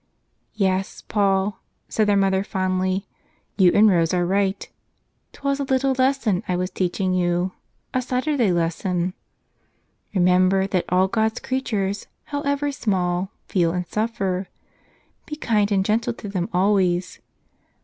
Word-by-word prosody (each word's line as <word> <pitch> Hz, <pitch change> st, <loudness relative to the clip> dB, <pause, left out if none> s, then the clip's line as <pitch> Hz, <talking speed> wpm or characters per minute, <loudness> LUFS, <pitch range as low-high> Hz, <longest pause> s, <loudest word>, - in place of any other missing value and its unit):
"Yes, 190 Hz, -2 st, -1 dB
Paul," 195 Hz, -1 st, +1 dB, 0.3 s
said 215 Hz, -1 st, +1 dB
their 205 Hz, -1 st, +3 dB
mother 195 Hz, -1 st, +2 dB
fondly, 185 Hz, -1 st, -1 dB, 0.5 s
"you 185 Hz, -3 st, +5 dB
and 215 Hz, +1 st, +7 dB
Rose 170 Hz, -3 st, +3 dB
are 175 Hz, -1 st, +1 dB
right. 195 Hz, +1 st, 0 dB, 0.6 s
'Twas 280 Hz, 0 st, -2 dB
a -, -, 0 dB
little 265 Hz, 0 st, +1 dB
lesson 260 Hz, -7 st, +1 dB
I 180 Hz, -, 0 dB
was 180 Hz, +1 st, -2 dB
teaching 185 Hz, 0 st, -1 dB
you 175 Hz, 0 st, +1 dB, 0.2 s
— -, -, -45 dB
a 255 Hz, -, +1 dB
Saturday 255 Hz, -3 st, 0 dB
lesson. 175 Hz, +1 st, -1 dB, 1.0 s
Remember 185 Hz, +1 st, +4 dB
that 190 Hz, -2 st, -1 dB
all 185 Hz, +1 st, +3 dB
God's 220 Hz, +3 st, 0 dB
creatures, 210 Hz, -6 st, -2 dB, 0.2 s
however 285 Hz, 0 st, -1 dB
small, 185 Hz, -7 st, -1 dB, 0.2 s
feel 170 Hz, -3 st, +1 dB
and 180 Hz, 0 st, -2 dB
suffer. 195 Hz, -3 st, -2 dB, 0.8 s
Be 300 Hz, -, -5 dB
kind 215 Hz, -8 st, +1 dB
and 195 Hz, -1 st, +2 dB
gentle 225 Hz, +3 st, +1 dB
to 220 Hz, -, -9 dB
them 185 Hz, -3 st, -2 dB
always. 185 Hz, -1 st, +1 dB
195 Hz, 135 wpm, -23 LUFS, 185-220 Hz, 1.0 s, and